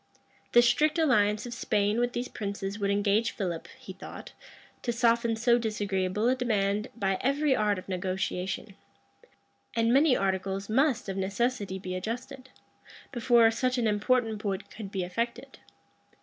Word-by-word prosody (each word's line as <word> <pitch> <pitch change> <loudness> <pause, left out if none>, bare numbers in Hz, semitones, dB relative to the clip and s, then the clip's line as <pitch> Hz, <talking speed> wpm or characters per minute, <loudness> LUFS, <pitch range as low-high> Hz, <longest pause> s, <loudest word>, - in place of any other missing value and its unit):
The 240 - +7
strict 305 +6 +3
alliance 215 -9 +3
of 240 - -6
Spain 210 -1 0
with 245 0 0
these 245 +1 -2
princes 200 -1 -5
would 200 -1 0
engage 205 +3 +1
Philip, 175 -5 -4
he - - -10
thought, - - -10 0.5
to 240 - -1
soften 235 -1 +2
so 240 +1 +3
disagreeable 205 -2 -1
a 250 - +4
demand 210 -4 0
by 195 -4 0
every 280 +1 +2
art 210 -3 +1
of 185 - -8
negotiation; 185 +1 -3 1.0
and 230 +1 +2
many 280 0 +5
articles 195 +1 -2
must 260 +1 +2
of 195 0 -4
necessity 200 0 -1
be 185 -1 -6
adjusted, 250 +7 -5 0.6
before 235 -2 +4
such 255 +2 0
an 240 - +1
important 220 +1 +1
point 200 -1 -4
could 210 -3 -8
be 190 -2 -2
effected. 235 +8 -4
220 Hz, 150 wpm, -28 LUFS, 195-245 Hz, 1.0 s, The